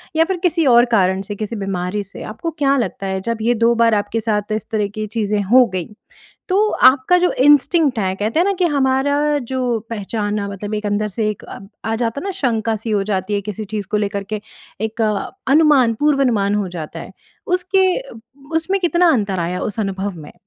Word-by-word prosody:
या 320 - +5
फिर 380 +1 -2
किसी 335 -2 +2
और 240 -1 +6
कारण 190 -3 +2
से, 205 +1 -6
किसी 215 +2 -4
बीमारी 195 0 -3
से। 195 - -11
आपको 280 +10 -4
क्या 275 -1 +3
लगता 215 -5 -3
है, 190 0 -2
जब 230 +3 -2
ये 235 +2 +2
2 235 +1 +5
बार 230 -1 +3
आपके 205 +2 -1
साथ 210 -1 -1
इस 215 0 -2
तरह 210 -2 0
की 215 - -2
चीज़ें 210 -1 -1
हो 245 +6 +5
गईं, 180 -3 -3 0.6
तो 405 +3 +3 0.2
आपका 280 +7 +2
जो 360 0 +2
इंस्टिंक्ट 290 0 +3
है, 190 -3 0
कहते 215 +8 -1
हैं - - +4
ना 400 - +2
कि 365 - +2
हमारा 285 +2 +2
जो 250 -3 0
पहचानना 205 -1 -3
मतलब 205 +2 -5
एक 210 0 -3
अंदर 205 +1 0
से 215 -1 +1
एक 210 - -8
अ, - - -9 0.3
आ 225 - -1
जाता 230 +3 -2
है - - -8
ना, 395 - -2
शंका 230 - -1
सी 220 +2 -6
हो 205 -2 +1
जाती 190 +2 -1
है 200 - 0
किसी 215 +2 -6
चीज़ 205 -2 -3
को - - +1
लेकर 200 -1 -2
के, 215 - -2 0.4
एक 220 +1 -3
अ, 210 -2 -1 0.2
अनुमान, 285 -6 +5
पूर्व 295 -2 +3
अनुमान 205 -5 +1
हो 205 -2 -1
जाता 165 -4 -7
है - - -10 0.4
उसके 370 +1 +2 0.2
उब 225 -1 -13 0.3
उसमें 335 +5 +1
कितना 350 0 +3
अंतर 200 -7 0
आया 175 +1 -2
उस 210 0 -4
अनुभव 195 -1 -2
में? 150 -2 -11
220 Hz, 215 wpm, -19 LUFS, 205-275 Hz, 0.6 s, और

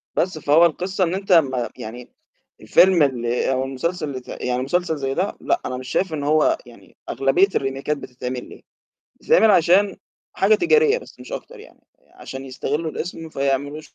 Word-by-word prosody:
بس، 180 -3 0
فهو 155 +3 +4
القصة 185 +3 -1
إن 170 +1 0
أنت 195 0 -4
أمّا 130 -8 +3
يعني 120 +3 -9 0.5
الفيلم 180 -4 +5
اللي 125 -2 0
أو 130 0 0
المسلسل 140 +1 -3
ت - - -26
يعني 125 0 -3
مسلسل 165 +2 -1
زي 135 -1 -2
ده، - - -2
لأ، - - 0
أنا 125 - -3
مش 130 0 -8
شايف 185 -4 0
إن 145 -2 -3
هو 155 +1 +3
يعني 110 -6 -17
أغلبية 135 +10 +3
الريميكات 135 +2 -1
بتتعمل 125 -1 -7
ليه؟ - - -13 0.6
بتتعمل 225 - +4
عشان 190 +2 +4 0.4
حاجة 205 +3 +3
تجارية 450 - +3
بس - - -16
مش - - -11
أكتر - - -8
يعني، 480 - -17 0.3
عشان 135 0 -8
يستغلّوا 145 +4 -3
الاسم 165 -1 -6
فيعملوا 140 +1 -2
150 Hz, 170 wpm, -21 LUFS, 130-180 Hz, 0.6 s, الفيلم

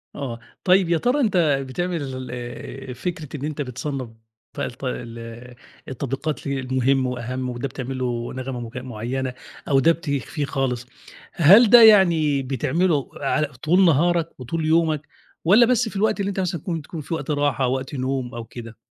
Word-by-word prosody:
آه. 120 -5 -5 0.2
طيب 185 -2 +4
يا 170 - +3
ترى 245 - +1
أنت 210 -6 +2 0.3
بتعمل 135 -4 -3
آآ 125 +2 -7
فكرة 160 +2 -5
إن 145 - -4
أنت 150 -1 -4
بتصنّف 130 -1 -4 0.5
بقى - - -1
الت 125 +3 -9
ال 120 0 -6 0.3
التطبيقات 135 +4 -4
المهم 130 -1 +1
وأهَم 125 +1 -4
وده 125 +2 -3
بتعمل 130 0 -5
له 120 -2 -2
نغمة 130 -1 -5
مك 120 +2 -7
معيّنة 125 +1 -4 0.4
أو 135 -2 +4
ده 165 +5 +5
بتخفيه 150 -2 -3
خالص، 125 -3 -2 0.5
هل 195 +8 +7
ده 240 +1 +9
يعني 170 -9 +6
بتعمله 145 +4 0
على 150 +2 0
طول 155 +8 +2
نهارك 170 +1 +3
وطول 155 +6 -3
يومك 155 -1 +2 0.4
والّا 215 +7 +7
بس 245 -1 +2
في - - -13
الوقت 210 +1 +1
اللي 200 0 0
أنت 195 -1 -3
مثلًا 175 -4 -2
تكون 165 -4 -3
تكون 155 +2 -7
في 155 - -6
وقت 150 -2 -3
راحة 145 -3 +1
وقت 130 +2 -3
نوم 130 -2 -2
أو 115 - -5
كده؟ 115 -2 -10
140 Hz, 165 wpm, -23 LUFS, 125-165 Hz, 0.5 s, ده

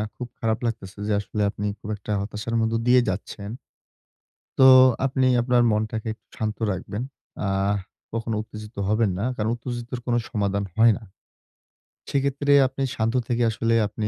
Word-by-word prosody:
খুব 125 - -6
খারাপ 110 -2 0
লাগতেছে 105 -4 -4
যে 105 - +1
আসলে 105 +1 -4
আপনি 105 - -5
খুব 105 - -8
একটা 105 +1 -7
হতাশার 105 +3 -4
মধ্য 110 0 0
দিয়ে 125 +1 +6
যাচ্ছেন। 100 +2 -5 1.1
তো 130 - +8 0.4
আপনি 130 -1 +1 0.2
আপনার 125 0 +3
মনটাকে 110 +1 -1
একটু - - -37
শান্ত 110 -1 -2 0.2
রাখবেন। 100 +4 -5 0.4
আ - - 0 0.6
কখনো 115 0 -2
উত্তেজিত 110 0 -10
হবেন 110 -1 +2
না। 100 - -1
কারণ 110 +1 0
উত্তেজিতর 120 +1 -5
কোনো 120 -1 +2
সমাধান 100 -3 0
হয় 115 0 +6
না। - - -19 1.1
সেইক্ষেত্রে 140 +1 0 0.2
আপনি 135 +1 -4
শান্ত 115 +2 0
থেকে 120 0 +1
আসলে 115 +1 0
আপনি 105 +1 -3
110 Hz, 155 wpm, -24 LUFS, 105-120 Hz, 1.1 s, তো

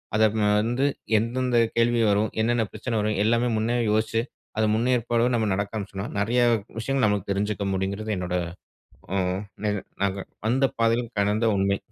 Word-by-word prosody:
அத 110 - +4
அப்னா 105 0 0
வந்து 120 +5 0 0.3
எந்தெந்த 120 +3 0 0.2
கேள்வி 115 0 +3
வரும்? 105 +2 +2
என்னென்ன 120 +1 +2
பிரச்சன 120 -3 -3
வரும்? 105 0 0
எல்லாமே 115 +2 +2
முன்னேயே 115 +3 0
யோசிச்சு, 110 +1 +1 0.4
அத 110 - +3
முன்னேற்பாடோடு 120 +1 +1
நம்ம 110 -2 +1
நடக்க 100 +2 -2
ஆரம்பிச்சனா, 100 -1 -5
நெறையா 120 +4 +2 0.4
விஷயங்கள் 135 +2 +1
நமக்கு 105 -1 -1
தெரிஞ்சுக்க 100 +1 -1
முடிங்றது, 100 +3 -2
என்னோட, 90 0 -3 0.8
ம் 95 0 0 0.2
நிக 105 0 +1 0.3
நாங்க 100 0 0 0.3
வந்த 130 +4 +3
பாதைலயும் 115 +1 +1
கடந்த 105 +3 +2
உண்மை. 100 +1 +2
110 Hz, 150 wpm, -25 LUFS, 100-120 Hz, 0.8 s, அத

